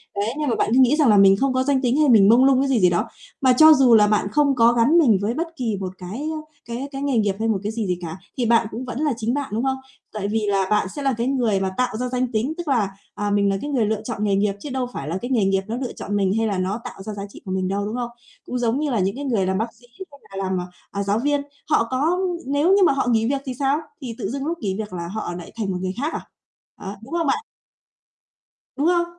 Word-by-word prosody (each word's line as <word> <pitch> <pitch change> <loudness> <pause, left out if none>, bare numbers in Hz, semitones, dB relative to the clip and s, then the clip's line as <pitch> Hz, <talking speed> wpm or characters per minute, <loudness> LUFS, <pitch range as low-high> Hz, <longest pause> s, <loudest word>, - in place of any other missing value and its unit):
đấy, 210 +4 -1
nhưng 295 -3 0
mà - - +1
bạn - - 0
cứ 260 - +5
nghĩ 260 +3 +5
rằng 295 -6 +3
là 210 - +6
mình 195 0 +7
không 270 +2 +1
có 260 0 +1
danh 275 -1 +1
tính 250 +2 +1
hay 300 -3 +4
mình 205 -4 +6
mông 245 +3 +6
lung 265 -1 +4
cái 275 - 0
gì 255 -4 +3
gì 180 -1 +5
đó. 215 +7 0 0.3
Mà 260 -1 +5
cho 310 +5 +8
dù 255 -5 +5
là 210 -1 +6
bạn 210 -1 +1
không 285 -1 +3
có 235 0 +5
gắn 245 +8 +4
mình 240 - +5
với 215 +3 0
bất 330 +6 -2
kỳ 225 -6 -2
một 185 -1 -4
cái, 185 +9 -7
ơ, 310 -1 -4 0.2
cái 240 +4 -5
cái 270 - -5
nghề 280 -3 0
nghiệp 205 -3 +1
hay 225 - 0
một 215 -3 +1
cái 210 - -2
gì 220 -3 -3
gì 180 -1 -1
cả, 165 0 -6 0.2
thì 245 - 0
bạn 230 -1 +3
cũng 240 +4 -5
vẫn 250 0 -5
là 300 -3 +1
chính 230 +1 -1
bạn, 285 -1 -2
đúng 225 +3 -1
không? 265 0 0 0.4
Tại 205 -2 -3
vì 220 +1 0
là 195 -1 +1
bạn 210 -2 +2
sẽ 290 - -4
là 270 -1 +1
cái 235 +2 -1
người 240 -7 +1
mà 190 -1 -1
tạo 250 -3 0
ra 250 +2 -2
danh 250 -1 -1
tính, 235 +6 -1
tức 345 - -6
là, 230 -8 +1 0.3
à, 205 0 -2
mình 200 0 +2
là 195 - 0
cái 290 - -4
người 255 -6 +1
lựa 215 0 -1
chọn 220 -2 -4
nghề 200 -2 +2
nghiệp 200 0 +1
chứ 295 - -7
đâu 260 -2 -2
phải 140 - -5
là 170 - -2
cái 245 - -5
nghề 225 -6 +2
nghiệp 195 0 +2
nó 225 - -3
lựa 255 -2 -4
chọn 205 - -5
mình 195 -1 +1
hay 225 0 +1
là 200 - -1
nó 190 +5 -2
tạo 195 - -9
ra 215 +1 -5
giá 200 -1 -6
trị - - -13
của 190 - -5
mình 185 0 -1
đâu, 200 +2 -1
đúng 215 +3 -4
không? 240 -1 -3 0.4
Cũng 250 - -3
giống 240 +3 0
như 300 - -1
là 230 - +1
những 195 +4 0
cái 285 - -5
người 220 -8 +1
làm 190 0 0
bác 225 +2 -3
sĩ 245 - -22 0.3
hay 285 - -15 0.2
là - - -2
làm, 190 -1 -1
à, 180 - -5 0.3
à, 200 - -2
giáo 200 +2 0
viên. 290 +2 +1 0.3
Họ 230 - +3
có 305 +7 +1 0.3
nếu 285 +5 +1
như 395 -1 +5
mà 280 - +4
họ 270 - -1
nghỉ 225 -1 +2
việc 275 -1 -1
thì 260 - -3
sao? 275 +1 +2 0.2
Thì 235 -4 -6
tự 215 -5 -3
dưng 275 +2 -4
lúc 335 +2 -2
nghỉ 195 -6 -2
việc 210 -3 -5
là 170 -1 -4
họ 190 -2 -4
lại 175 -1 -9
thành 210 -4 -2
một 180 - -2
người 185 0 -2
khác 310 +3 -2
à? - - -3 0.6
Đó, 195 +1 -6
đúng 265 - -10
không 335 -3 0
bạn? 275 - 0 1.3
Đúng 295 +4 +1
không? 345 -1 +3
230 Hz, 305 wpm, -22 LUFS, 200-270 Hz, 1.3 s, cho